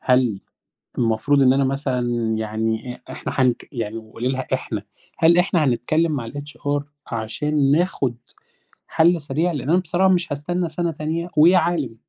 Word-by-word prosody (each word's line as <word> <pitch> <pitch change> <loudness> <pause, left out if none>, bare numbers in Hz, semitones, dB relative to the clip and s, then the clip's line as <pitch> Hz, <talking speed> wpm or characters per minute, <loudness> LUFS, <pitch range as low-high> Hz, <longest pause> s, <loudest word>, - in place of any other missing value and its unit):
هل 125 -6 +2 0.6
المفروض 120 +5 +2
إن 130 -1 +6
أنا 135 +1 +2
مثلًا 135 -2 -1 0.4
يعني 110 +2 -2
أ - - -16
إحنا - - -5
حنك 125 -3 +1
يعني 115 -3 -4
قوليلها 125 +4 -4
إحنا 110 -5 -3 0.4
هل 170 +1 +5
إحنا 180 -3 +2
هنتكلّم 150 +6 +1
مع 120 -6 -3
الHR 145 0 -3 0.3
عشان 135 +6 0
ناخد 150 -7 +1 0.7
حل 165 0 +3
سريع؟ 155 +5 0
لإن 145 -3 -4
أنا 175 +3 +4
بصراحة 185 +2 +1
مش 175 -3 -1
هاستنى 175 +5 -2
سنة 170 +1 -1
تانية 160 +3 -3
ويا 170 +5 +7
عالم. 160 -8 0
145 Hz, 150 wpm, -22 LUFS, 125-165 Hz, 0.7 s, ويا